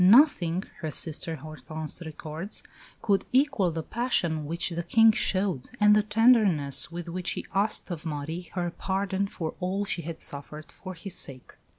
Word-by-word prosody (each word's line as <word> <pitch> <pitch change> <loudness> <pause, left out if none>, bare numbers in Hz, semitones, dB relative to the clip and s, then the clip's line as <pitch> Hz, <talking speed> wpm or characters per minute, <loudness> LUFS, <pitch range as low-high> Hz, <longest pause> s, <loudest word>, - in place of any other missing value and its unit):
"Nothing," 190 - +6 0.2
her 155 - -3
sister 160 +2 -2
Hortense 155 +2 -5
records, 160 +4 -6 0.4
"could 200 -2 +3
equal 255 -8 +3
the 165 -1 -3
passion 170 - 0
which 170 +3 -2
the 170 0 -2
King 225 +6 +6
showed, 185 -9 0
and 210 0 +7
the 210 - +5
tenderness 210 - +4
with 175 0 -6
which 175 +1 -2
he - - -5
asked 200 0 +1
of 165 -3 -4
Marie 160 +2 -4
her 175 -1 -1
pardon 195 +2 -1
for 165 -5 -4
all 190 +2 -1
she 195 -4 -2
had 165 0 -6
suffered 150 +2 -8
for 185 -1 -8
his 180 +2 -6
sake." 130 -7 -3
175 Hz, 165 wpm, -28 LUFS, 160-200 Hz, 0.4 s, and